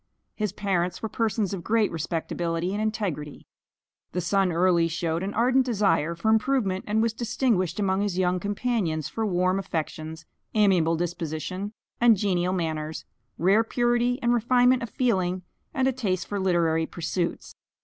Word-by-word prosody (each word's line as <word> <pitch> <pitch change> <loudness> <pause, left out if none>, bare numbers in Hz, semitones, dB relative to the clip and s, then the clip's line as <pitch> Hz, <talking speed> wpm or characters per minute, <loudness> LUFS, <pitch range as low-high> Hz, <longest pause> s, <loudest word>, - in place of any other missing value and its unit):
His 210 -3 -1
parents 185 -3 -1
were 220 - -2
persons 215 -4 -1
of 180 -3 -5
great 220 +1 +2
respectability 165 +2 -2
and 210 - -2
integrity. 195 -10 -3 0.7
The 180 - -1
son 195 +1 +2
early 170 0 +3
showed 165 0 -2
an 195 +2 -4
ardent 250 +4 +3
desire 200 -9 +1
for 170 +6 -1
improvement, 220 -4 +1
and 215 +1 +2
was 230 -1 +1
distinguished 225 - 0
among 195 -1 +1
his 200 -3 -1
young 180 -1 +1
companions 205 - -1
for 225 -1 -2
warm 185 0 +1
affections, 160 -2 -5 0.3
amiable 185 -6 +4
disposition, 175 +4 -4 0.3
and 235 -3 +6
genial 185 -2 +1
manners, 160 -3 -3 0.3
rare 195 +6 +4
purity 240 +1 +1
and 240 0 +3
refinement 245 +2 +3
of 235 - -4
feeling, 185 -7 0 0.3
and 265 -3 +1
a - - +3
taste 205 -8 -2
for 205 - -3
literary 165 -4 +1
pursuits. 170 +1 -3
190 Hz, 150 wpm, -26 LUFS, 170-220 Hz, 0.7 s, and